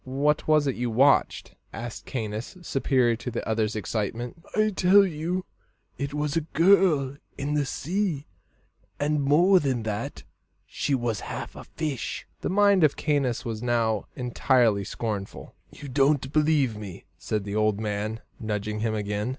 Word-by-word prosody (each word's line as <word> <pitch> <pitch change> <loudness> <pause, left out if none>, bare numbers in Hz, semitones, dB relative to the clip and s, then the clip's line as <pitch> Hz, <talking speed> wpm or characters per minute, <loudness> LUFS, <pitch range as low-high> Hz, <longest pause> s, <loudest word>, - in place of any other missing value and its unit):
"What 140 +3 0
was 155 -1 +4
it 135 - +1
you 120 0 -2
watched?" 135 +5 +3 0.2
asked 120 0 -7
Caius, 110 - -4
superior 130 -5 +2
to 125 - -5
the 120 - -4
other's 110 -1 0
excitement. 115 +7 -3
"I 215 0 +3
tell 195 +2 +6
you, 175 +2 -3 0.5
it 140 +1 -4
was 150 0 -2
a 165 - +2
girl 160 -4 +3 0.2
in 145 +1 -2
the 145 -2 +1
sea; 170 -2 -2 0.7
and 150 +1 +1
more 170 +7 +5
than 130 -6 -1
that 105 -2 -4 0.4
she 140 - -1
was 120 -4 -1
half - - -6
a - - -9
fish." 150 -8 -4
The - - -3
mind 200 -1 +4
of 150 - +3
Caius 140 -5 0
was 110 -2 -4
now 115 -3 0
entirely 120 -4 +2
scornful. 105 -2 -5 0.2
"You 145 - -10
don't 135 0 +2
believe 150 -6 +2
me," 100 -4 -9
said 105 -2 -2
the 100 +1 -5
old 110 -1 +2
man, 110 +1 -3 0.2
nudging 105 -1 -3
him 110 0 -1
again. 105 +1 -2
130 Hz, 155 wpm, -26 LUFS, 110-150 Hz, 0.7 s, tell